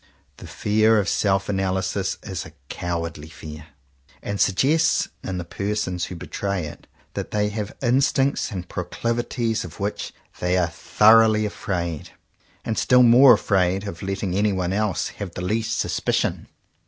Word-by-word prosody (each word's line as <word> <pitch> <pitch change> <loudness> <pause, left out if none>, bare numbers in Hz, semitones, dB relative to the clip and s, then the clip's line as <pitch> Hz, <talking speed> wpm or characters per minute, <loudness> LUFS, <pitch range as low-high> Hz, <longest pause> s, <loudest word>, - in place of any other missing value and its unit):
The - - -11
fear 110 +1 +2
of 100 -2 +1
self 95 -1 +1
analysis 95 0 -1
is 95 - -5
a 75 - -12 0.2
cowardly 85 -3 -4
fear, 75 +1 -10 0.6
and 100 -1 -2
suggests 150 - +2
in 95 -1 -4
the 90 - -3
persons 95 0 -2
who 90 - -7
betray 100 +1 -3
it, 75 - -10 0.3
that - - -4
they 105 -1 0
have 105 -1 -5
instincts 135 +2 +2
and 90 -4 -5
proclivities 115 +5 -2
of 85 -2 -10
which 100 +1 -3 0.3
they 90 +1 +1
are 85 -2 +1
thoroughly 110 +4 +4
afraid; 85 -6 -4 0.5
and 110 - -1
still 125 0 +5
more 125 +2 +8
afraid 95 -1 +1
of 85 -4 -7
letting 95 -1 -3
any 100 +1 +2
one 90 -1 -1
else 105 -1 0
have 95 -4 -5
the - - -4
least 110 +4 -1
suspicion. - - -1
100 Hz, 150 wpm, -23 LUFS, 90-110 Hz, 0.6 s, more